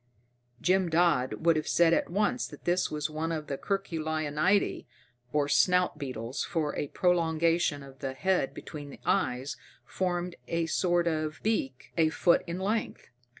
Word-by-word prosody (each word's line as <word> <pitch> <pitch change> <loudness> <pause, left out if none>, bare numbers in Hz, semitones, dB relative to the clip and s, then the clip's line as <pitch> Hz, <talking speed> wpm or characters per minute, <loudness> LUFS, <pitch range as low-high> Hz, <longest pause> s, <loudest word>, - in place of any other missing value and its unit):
Jim 185 -1 +2
Dodd 165 -3 +2
would 165 -1 +5
have 155 0 -1
said 170 -1 +4
at - - +1
once 210 +7 0
that 145 - -13
this 180 +1 +2
was 150 0 -2
one 155 +1 -3
of 155 -2 -3
the 140 - -3
Curculionidae, 160 0 0 0.4
or 145 0 +1
snout 180 +1 +3
beetles, 130 -2 -4
for 160 -4 -2
a 145 - -2
prolongation 165 -3 +1
of 135 -1 -14
the 135 -1 -4
head 185 -5 +1
between 145 -2 -8
the - - -11
eyes 125 +3 0 0.3
formed 180 -1 -2
a 165 0 0
sort 175 +1 +1
of 155 -2 -1
beak 135 - -2
a 160 -1 +4
foot 170 +2 +3
in 170 +1 -3
length. 210 - -2
165 Hz, 155 wpm, -29 LUFS, 150-180 Hz, 0.4 s, would